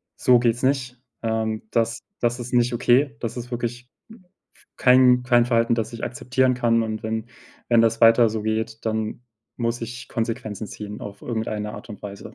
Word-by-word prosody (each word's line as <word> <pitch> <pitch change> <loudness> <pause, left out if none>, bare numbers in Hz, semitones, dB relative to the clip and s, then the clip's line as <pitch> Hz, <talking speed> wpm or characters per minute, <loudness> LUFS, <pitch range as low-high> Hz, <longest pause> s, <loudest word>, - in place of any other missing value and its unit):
so 125 -1 +5
geht's 120 0 +1
nicht. 130 -2 0 0.3
Ähm, 110 -1 -1
das 115 -1 0 0.2
das 120 +1 0
ist 120 +1 -7
nicht 120 0 +3
okay, 130 +4 +3
das 115 -1 -4
ist 120 0 -6
wirklich 120 +1 -4 0.2
m 220 -4 -16 0.3
f - - -25
kein 125 -1 +5
kein 120 -1 +4
Verhalten, 115 -1 +2
das 115 0 -3
ich 115 - -8
akzeptieren 130 +1 0
kann 115 -2 +2
und 110 -1 -4
wenn 110 +1 -3 0.4
wenn 120 -1 +5
das 115 0 +1
weiter 115 0 +7
so 110 0 -3
geht, 110 +1 -2
dann 110 +1 -2 0.4
muss 115 0 -1
ich 120 +2 -7
Konsequenzen 115 -3 -3
ziehen 105 0 -8
auf 100 -1 -8
irgendeine 110 -3 -3
Art - - -10
und 105 - -9
Weise“, 100 0 -9
115 Hz, 185 wpm, -23 LUFS, 110-125 Hz, 0.4 s, weiter